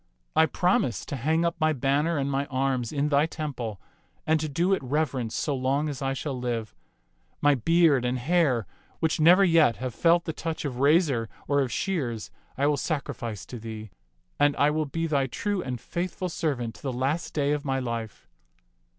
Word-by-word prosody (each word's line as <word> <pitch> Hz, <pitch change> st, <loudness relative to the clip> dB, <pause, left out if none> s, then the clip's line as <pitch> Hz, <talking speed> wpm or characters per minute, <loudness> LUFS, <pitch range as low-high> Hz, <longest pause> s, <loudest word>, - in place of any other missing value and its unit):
I 160 Hz, 0 st, +5 dB
promise 165 Hz, -7 st, +1 dB
to -, -, -4 dB
hang 160 Hz, +6 st, +1 dB
up 170 Hz, -, 0 dB
my 155 Hz, 0 st, +3 dB
banner 145 Hz, +5 st, +1 dB
and 140 Hz, -1 st, 0 dB
my 140 Hz, +1 st, -1 dB
arms 130 Hz, -2 st, -1 dB
in 145 Hz, 0 st, 0 dB
thy 145 Hz, +2 st, +3 dB
temple 130 Hz, -, -5 dB, 0.5 s
and 160 Hz, 0 st, +3 dB
to 155 Hz, 0 st, -3 dB
do 175 Hz, +7 st, +1 dB
it 190 Hz, -, 0 dB
reverence 130 Hz, -4 st, -1 dB
so 145 Hz, -, -1 dB
long 135 Hz, +3 st, 0 dB
as 140 Hz, -2 st, -6 dB
I 135 Hz, 0 st, 0 dB
shall 140 Hz, +1 st, -4 dB
live. 120 Hz, -3 st, -3 dB, 0.7 s
My 145 Hz, 0 st, +4 dB
beard 150 Hz, 0 st, +3 dB
and 125 Hz, +1 st, 0 dB
hair, 135 Hz, -, +2 dB, 0.3 s
which 160 Hz, -1 st, 0 dB
never 175 Hz, +5 st, +7 dB
yet 165 Hz, -9 st, +5 dB
have 130 Hz, -1 st, -5 dB
felt 170 Hz, +4 st, +3 dB
the 160 Hz, -, -3 dB
touch 160 Hz, 0 st, -4 dB
of 125 Hz, -3 st, -4 dB
razor 140 Hz, -, +3 dB, 0.2 s
or 140 Hz, 0 st, +2 dB
of 130 Hz, -3 st, -1 dB
shears, 130 Hz, -, -2 dB, 0.3 s
I 140 Hz, -, +1 dB
will 145 Hz, 0 st, +2 dB
sacrifice 120 Hz, -, -3 dB
to 125 Hz, -, -8 dB
thee, 110 Hz, -2 st, -8 dB, 0.5 s
and 145 Hz, 0 st, +4 dB
I 145 Hz, +1 st, +3 dB
will 155 Hz, 0 st, -1 dB
be 165 Hz, +4 st, -2 dB
thy 140 Hz, -4 st, +1 dB
true 205 Hz, -, -2 dB
and 125 Hz, -5 st, -4 dB
faithful 180 Hz, -, -3 dB
servant 135 Hz, -9 st, -2 dB
to -, -, -16 dB
the 135 Hz, -, -2 dB
last 135 Hz, +7 st, -2 dB
day 145 Hz, -1 st, +1 dB
of 145 Hz, -1 st, -1 dB
my 135 Hz, -2 st, -1 dB
life." 115 Hz, -4 st, -5 dB
140 Hz, 195 wpm, -26 LUFS, 125-160 Hz, 0.7 s, never